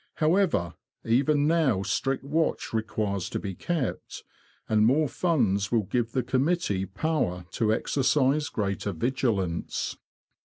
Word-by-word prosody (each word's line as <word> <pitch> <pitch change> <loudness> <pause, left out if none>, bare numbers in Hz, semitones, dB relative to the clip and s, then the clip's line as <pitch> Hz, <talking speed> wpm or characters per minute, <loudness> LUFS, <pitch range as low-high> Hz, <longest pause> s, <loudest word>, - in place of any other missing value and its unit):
However, 160 - +2 0.3
even 140 +5 +3
now 150 - +2
strict 130 +6 -1
watch 155 0 -1
requires 105 -3 -2
to - - -3
be 100 -2 -5
kept, 155 - -3 0.4
and 110 -1 +3
more 145 +7 +3
funds 115 - +1
will 115 -3 +2
give 115 +4 -2
the 130 - +1
committee 130 - 0
power 95 - -1
to 110 -2 +1
exercise 140 +4 +1
greater 100 -1 -2
vigilance. 100 -5 -1
120 Hz, 120 wpm, -27 LUFS, 100-150 Hz, 0.4 s, even